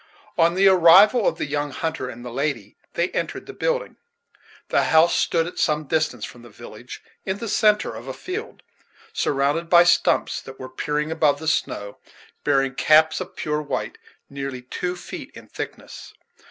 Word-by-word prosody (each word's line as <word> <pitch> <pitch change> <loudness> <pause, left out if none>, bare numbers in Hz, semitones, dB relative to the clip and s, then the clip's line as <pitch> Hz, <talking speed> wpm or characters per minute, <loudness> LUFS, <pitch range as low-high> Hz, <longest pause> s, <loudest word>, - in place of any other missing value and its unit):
On 170 +1 +3
the 195 +1 +5
arrival 190 +5 +6
of - - 0
the - - -2
young 145 0 -2
hunter 140 -2 -4
and 120 +1 -10
the 120 - -6
lady, 130 -6 -3 0.2
they 170 +2 0
entered - - -4
the - - -9
building. - - -2 0.7
The - - +2
house 160 +2 +4
stood 165 -1 +1
at 175 - -7
some 150 -2 +1
distance 150 -6 -1
from 120 - -12
the 120 - -14
village, 115 +2 -11 0.2
in 190 0 -3
the 230 - -6
centre 210 0 +2
of - - -9
a - - -4
field, 430 +5 -7 0.5
surrounded 145 +4 0
by 175 0 +7
stumps 175 - +2
that 135 0 -12
were 130 - -7
peering 150 +4 -2
above 155 -3 +2
the 160 +2 -7
snow, 100 -9 -2 0.4
bearing 135 -2 +1
caps 155 +4 +4
of - - -8
pure 150 0 -2
white, 150 - -4 0.3
nearly 135 -2 -6
two 180 +8 -4
feet 175 - -9
in - - -12
thickness. - - -8
155 Hz, 175 wpm, -23 LUFS, 135-175 Hz, 0.7 s, by